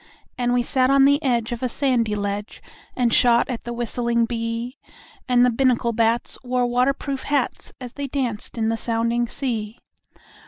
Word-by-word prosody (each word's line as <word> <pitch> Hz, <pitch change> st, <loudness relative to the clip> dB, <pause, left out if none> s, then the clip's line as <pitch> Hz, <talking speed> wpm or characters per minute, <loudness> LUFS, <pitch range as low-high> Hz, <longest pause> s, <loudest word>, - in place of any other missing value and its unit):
And 245 Hz, -1 st, 0 dB
we 245 Hz, 0 st, +2 dB
sat 255 Hz, +1 st, +2 dB
on 275 Hz, 0 st, +5 dB
the 285 Hz, +2 st, +4 dB
edge 240 Hz, -5 st, 0 dB
of 240 Hz, -, -4 dB
a 255 Hz, -, -1 dB
sandy 240 Hz, -5 st, 0 dB
ledge 205 Hz, 0 st, -4 dB, 0.4 s
And 240 Hz, -2 st, +1 dB
shot 240 Hz, -1 st, +4 dB
at 240 Hz, -, -6 dB
the 240 Hz, -, -4 dB
whistling 235 Hz, 0 st, 0 dB
bee; 230 Hz, +2 st, -4 dB, 0.5 s
And 245 Hz, 0 st, +5 dB
the 250 Hz, -, +3 dB
Binnacle 240 Hz, -1 st, +1 dB
bats 230 Hz, +1 st, 0 dB
wore 250 Hz, 0 st, 0 dB
water 250 Hz, +3 st, +2 dB
proof 275 Hz, -1 st, -5 dB
hats 285 Hz, -2 st, -1 dB
As 250 Hz, -2 st, -8 dB
they 285 Hz, -1 st, -4 dB
danced 245 Hz, -6 st, -3 dB
in 220 Hz, -1 st, +1 dB
the 225 Hz, -, 0 dB
sounding 235 Hz, +1 st, 0 dB
sea. 230 Hz, -4 st, -4 dB
240 Hz, 180 wpm, -22 LUFS, 230-255 Hz, 0.5 s, on